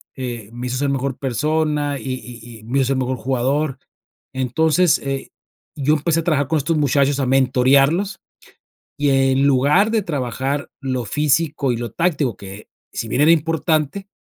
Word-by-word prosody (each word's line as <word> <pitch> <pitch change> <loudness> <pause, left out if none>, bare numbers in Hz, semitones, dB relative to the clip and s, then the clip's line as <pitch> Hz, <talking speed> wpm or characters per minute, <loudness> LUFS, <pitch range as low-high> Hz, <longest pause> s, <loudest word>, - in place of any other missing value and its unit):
eh, 120 -5 -6
me 120 +1 -5
hizo 125 +1 -2
ser 140 +1 0
mejor 135 -1 -2
persona, 150 +1 -1
y 130 - -4
y 120 -2 -11
y - - -18
me 125 +5 -1
hizo 135 +1 +1
mejor 130 0 -1
jugador. 135 +3 -1 0.6
Entonces, 155 +7 +2
eh, 135 -1 -4 0.5
yo 145 +1 +2
empecé 165 +2 0
a - - -9
trabajar 145 -5 +1
con 160 - +2
estos 155 +3 0
muchachos 140 -1 +2
a 135 - +1
mentorearlos, 135 +8 +3 0.8
y 145 0 +1
en 135 0 +3
lugar 145 +11 +3
de 220 -2 +1
trabajar 140 -2 -3
lo 130 -2 -2
físico 150 +1 0
y - - -3
lo 120 0 -5
táctico 150 - 0
que, 100 +1 -11 0.2
si 115 - -4
bien 130 - 0
era 155 +2 +6
importante, 160 +3 0
140 Hz, 165 wpm, -20 LUFS, 130-155 Hz, 0.8 s, era